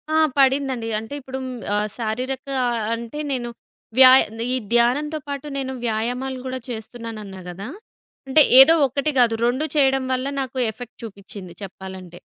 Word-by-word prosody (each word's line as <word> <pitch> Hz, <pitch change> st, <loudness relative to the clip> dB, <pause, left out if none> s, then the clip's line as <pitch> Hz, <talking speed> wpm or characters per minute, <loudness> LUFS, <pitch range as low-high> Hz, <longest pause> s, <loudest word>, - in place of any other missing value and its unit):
ఆ! -, -, +4 dB, 0.2 s
పడిందండి. 265 Hz, -3 st, +2 dB
అంటే 225 Hz, +5 st, -9 dB
ఇప్పుడు 265 Hz, 0 st, -6 dB, 0.4 s
ఆహ్, 210 Hz, 0 st, 0 dB
శారీరక 250 Hz, +3 st, -3 dB, 0.2 s
ఆహ్, 240 Hz, -2 st, 0 dB
అంటే 235 Hz, +5 st, -7 dB
నేను 245 Hz, -3 st, -2 dB, 0.5 s
వ్యాయ్ 260 Hz, 0 st, +9 dB, 0.3 s
ఈ -, -, +1 dB, 0.2 s
ధ్యానంతో 285 Hz, +6 st, +2 dB
పాటు 280 Hz, 0 st, -5 dB
నేను 265 Hz, -1 st, -3 dB
వ్యాయామాలు 245 Hz, +4 st, -2 dB
కూడా 260 Hz, 0 st, -4 dB
చేస్తున్నానన్నా 220 Hz, -3 st, -7 dB
గదా! 195 Hz, +4 st, -7 dB, 0.6 s
అంటే 270 Hz, +4 st, +5 dB, 0.2 s
ఏదో 270 Hz, +5 st, +9 dB
1 280 Hz, +4 st, -1 dB
కాదు 235 Hz, -2 st, +4 dB
2 255 Hz, +6 st, +1 dB
చేయడం 270 Hz, -2 st, +3 dB
వల్ల 255 Hz, +1 st, -2 dB
నాకు 260 Hz, -1 st, -6 dB
ఎఫెక్ట్ 245 Hz, +1 st, -11 dB
చూపించింది 200 Hz, -4 st, -9 dB
చెప్పాలంటే. 190 Hz, -2 st, -9 dB
245 Hz, 140 wpm, -22 LUFS, 220-265 Hz, 0.6 s, వ్యాయ్